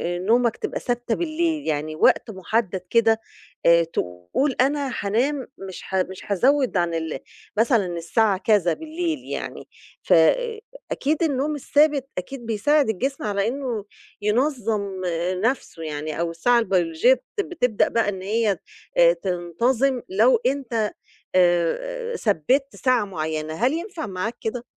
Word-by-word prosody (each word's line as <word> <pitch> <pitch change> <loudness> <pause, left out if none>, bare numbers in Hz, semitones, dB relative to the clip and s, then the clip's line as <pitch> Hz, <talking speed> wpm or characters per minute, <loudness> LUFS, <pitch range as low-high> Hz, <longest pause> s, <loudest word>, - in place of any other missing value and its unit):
آآ - - -3
نومك 230 +4 +2
تبقى - - -3
ثابتة 240 -1 -1
بالليل؟ 325 -2 -1
يعني 155 0 -1
وقت 220 - +3
مُحدَّد 190 -1 -1
كده، 225 -1 +3 0.4
آآ 170 0 +6
تقول 90 - -2
أنا 280 0 +1
هانام 250 +7 0
مش 190 -1 -8
ه 190 -1 +3
مش 190 - -9
هازوِّد 260 +3 +3
عن 175 -1 +1
ال 160 -3 -3 0.4
مثلًا 225 -2 +3
الساعة 195 +4 +2
كذا 195 -5 +2
بالليل 320 - -3
يعني. - - -4 0.5
ف - - +3 0.8
أكيد 310 +4 0
النوم 295 0 0
الثابت 290 -1 +2
أكيد 240 +7 -6
بيساعد 275 +5 +2
الجسم 265 +7 -2
على 200 -1 0
إنه 245 -4 -3 0.4
ينظَّم 210 -4 0 0.4
نَفْسه 230 -9 -1
يعني 155 0 -4
أو 170 0 0
الساعة 235 +9 +3
البيولوجية 185 +1 +3
بتب 360 - -5
بتبدأ 250 - +1
بقى 230 -3 +1
إن 190 -2 -5
هي 210 +1 +1 0.4
آآ - - +7
تنتظم 230 - 0
لو 445 +6 +4
أنت 235 -6 0 0.4
آآ 325 - +1
ثبِّت 255 - +1
ساعة 255 -4 +2
معيّنة. 155 -4 -3
هل 245 - +1
ينفع 340 -1 -4
معاك 195 +4 -4
كده؟ 235 +2 -4
225 Hz, 135 wpm, -23 LUFS, 185-275 Hz, 0.8 s, آآ